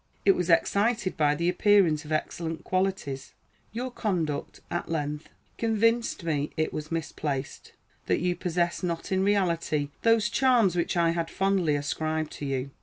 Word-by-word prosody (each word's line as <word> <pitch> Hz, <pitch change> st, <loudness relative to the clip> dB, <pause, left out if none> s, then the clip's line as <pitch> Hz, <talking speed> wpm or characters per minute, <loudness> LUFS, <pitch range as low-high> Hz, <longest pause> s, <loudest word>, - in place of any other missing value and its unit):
It 200 Hz, -, +8 dB
was 180 Hz, -2 st, -1 dB
excited 200 Hz, +4 st, +2 dB
by 150 Hz, -1 st, +2 dB
the 170 Hz, +3 st, -1 dB
appearance 180 Hz, -4 st, +3 dB
of 150 Hz, -, -9 dB
excellent 160 Hz, +1 st, -2 dB
qualities. 185 Hz, -8 st, -2 dB, 0.4 s
Your 250 Hz, +3 st, -4 dB
conduct, 170 Hz, -11 st, -2 dB
at 175 Hz, -, -3 dB
length, 150 Hz, -1 st, -3 dB, 0.3 s
convinced 230 Hz, -2 st, +1 dB
me 150 Hz, -3 st, -1 dB
it 155 Hz, -, 0 dB
was 155 Hz, +1 st, -5 dB
misplaced; 150 Hz, -4 st, -4 dB, 0.3 s
that -, -, +2 dB
you 180 Hz, 0 st, 0 dB
possessed 175 Hz, +1 st, -1 dB
not 170 Hz, +2 st, -3 dB
in 190 Hz, 0 st, +2 dB
reality 170 Hz, -7 st, +1 dB
those 225 Hz, -1 st, +4 dB
charms 235 Hz, -8 st, +3 dB
which 175 Hz, +1 st, 0 dB
I 170 Hz, -1 st, +3 dB
had 165 Hz, -1 st, -2 dB
fondly 190 Hz, -6 st, +1 dB
ascribed 155 Hz, +2 st, -2 dB
to 145 Hz, -, -6 dB
you. 135 Hz, 0 st, -2 dB
170 Hz, 155 wpm, -27 LUFS, 155-195 Hz, 0.4 s, It